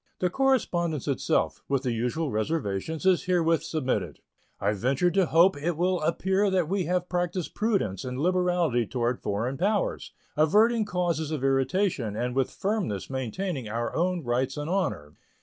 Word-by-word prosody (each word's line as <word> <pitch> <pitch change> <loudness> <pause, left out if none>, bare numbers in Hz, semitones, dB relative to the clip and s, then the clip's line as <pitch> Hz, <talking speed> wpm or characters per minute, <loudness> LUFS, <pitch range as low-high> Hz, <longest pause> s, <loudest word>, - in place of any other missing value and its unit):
The 180 -1 0
correspondence 175 - +1
itself, 140 -3 0
with 135 -1 +1
the 125 - 0
usual 125 +7 -1
reservations, 110 - -2
is 185 -2 +3
herewith 165 -3 +2
submitted. 145 -5 -2 0.4
I 100 +2 +1
venture 130 - +1
to 190 -1 +2
hope 170 +3 +5
it 155 +3 -2
will 180 0 +1
appear 190 +5 +1
that 185 -4 +1
we 190 0 0
have 180 +1 0
practiced 175 -1 -2
prudence 195 - 0
and 125 0 -4
liberality 175 - +1
toward 120 +1 -1
foreign 120 +7 -2
powers, 205 +3 0 0.2
averting 215 +9 +4
causes 175 -5 -1
of 155 -4 -3
irritation 135 - +1
and 125 +3 -2
with 135 -1 +1
firmness 190 - -2
maintaining 130 - -3
our 115 +2 -3
own 175 0 0
rights 125 +2 -1
and 150 +3 -3
honor. 150 - -1
160 Hz, 155 wpm, -27 LUFS, 125-180 Hz, 0.4 s, hope